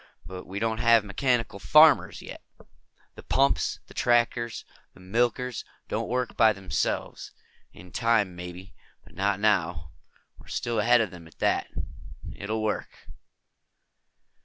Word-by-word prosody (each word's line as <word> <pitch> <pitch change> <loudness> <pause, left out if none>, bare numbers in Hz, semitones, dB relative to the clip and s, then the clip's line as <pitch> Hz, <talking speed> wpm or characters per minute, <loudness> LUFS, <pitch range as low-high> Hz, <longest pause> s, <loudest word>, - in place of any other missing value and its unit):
But 90 +2 -9
we 95 - -6
don't 110 +1 -1
have 115 -2 +5
mechanical 115 -1 0
farmers, 150 +4 +5
yet. - - -9 0.7
The - - -11
pumps, 135 +1 +1
the - - -16
tractors, 120 -1 +1 0.3
the - - -17
milkers 120 +5 -1 0.3
don't - - -2
work 125 0 -2
by 110 -1 +5
themselves. 95 -2 -3 0.4
In 90 +1 -14
time, 115 -6 +1
maybe. 90 +2 -9 0.3
Not 100 +2 -1
now. 85 -7 0 0.5
We're - - -17
still 120 -2 -2
ahead 120 +3 +5
of 110 - -2
them 85 -3 -12
on 80 - -18
that. - - +1 0.7
It'll 110 +2 -3
work." 110 - -4
110 Hz, 130 wpm, -27 LUFS, 95-120 Hz, 0.7 s, have